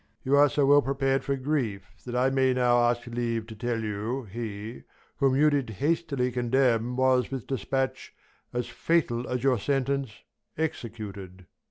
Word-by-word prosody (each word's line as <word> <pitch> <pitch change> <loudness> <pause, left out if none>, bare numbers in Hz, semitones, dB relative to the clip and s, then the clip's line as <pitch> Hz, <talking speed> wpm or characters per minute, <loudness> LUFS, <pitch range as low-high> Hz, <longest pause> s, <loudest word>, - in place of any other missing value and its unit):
You 135 +2 +2
are 145 0 +6
so 145 0 +2
well 145 +1 +6
prepar'd 135 0 0
for 140 - 0
grief, 130 -8 -1 0.2
That 120 - -4
I 130 +2 +2
may 130 -1 +2
now 120 -1 +3
ask 120 0 -2
leave 115 -2 -2
to 110 0 -10
tell 115 +1 -2
you, 110 +5 -3
he, 110 +1 -6 0.4
whom 135 -2 +3
You 150 +2 +4
did 140 -5 0
hastily 140 - 0
condemn, 125 -1 +1
was, 130 -1 +3
with 135 -4 -5
dispatch, 130 +1 -2 0.4
As 120 -1 -2
fatal 125 -3 0
as 125 -1 -2
your 130 -4 +3
sentence, 135 0 -1 0.5
executed. 105 - -5
125 Hz, 160 wpm, -27 LUFS, 115-135 Hz, 0.5 s, are